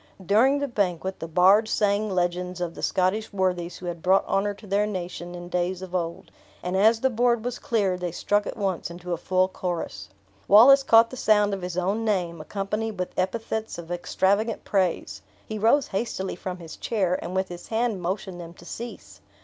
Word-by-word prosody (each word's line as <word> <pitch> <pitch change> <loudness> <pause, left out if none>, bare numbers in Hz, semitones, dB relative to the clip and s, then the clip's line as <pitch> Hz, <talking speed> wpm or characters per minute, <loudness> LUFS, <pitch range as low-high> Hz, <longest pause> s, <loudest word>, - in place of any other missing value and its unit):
During 235 +9 +4
the 285 0 -1
banquet 190 -5 -2
the 165 - -5
bards 190 +6 +5
sung 210 0 +1
legends 180 -1 -1
of 175 -2 -3
the - - -9
Scottish 190 +4 0
worthies 180 -3 -1
who 180 - -10
had 175 -1 -5
brought 190 +3 +3
honor 200 +1 0
to 210 - -15
their 205 +1 +1
nation 175 -3 -5
in 175 0 -8
days 180 +1 -2
of 185 -1 -9
old; 170 -2 -3 0.3
and 180 +1 -2
as 220 +4 +4
the 265 - +3
board 240 0 +1
was 245 0 -3
cleared, 195 -6 0
they 180 -1 -3
struck 205 +4 0
at - - -5
once 190 -5 -2
into 175 +1 -6
a - - -1
full 185 +2 +1
chorus. 175 - -5 0.4
Wallace 250 +7 +8
caught 230 -3 +5
the 255 - -7
sound 210 -3 +3
of 195 - -3
his 180 0 -5
own 195 +5 0
name, 180 -7 -1
accompanied 210 +4 -3
with 180 0 -3
epithets 220 +3 -2
of 170 0 -8
extravagant 200 +5 0
praise; 180 - -1 0.2
he 215 -1 -5
rose 245 +6 +3
hastily 195 -2 -3
from 180 0 -5
his 165 -3 -10
chair, 190 -5 0
and 180 - -5
with 190 0 0
his 175 0 -9
hand 225 -3 -1
motioned 185 0 -4
them 170 0 -10
to 175 - -15
cease. 235 +6 -8
190 Hz, 200 wpm, -25 LUFS, 180-215 Hz, 0.4 s, Wallace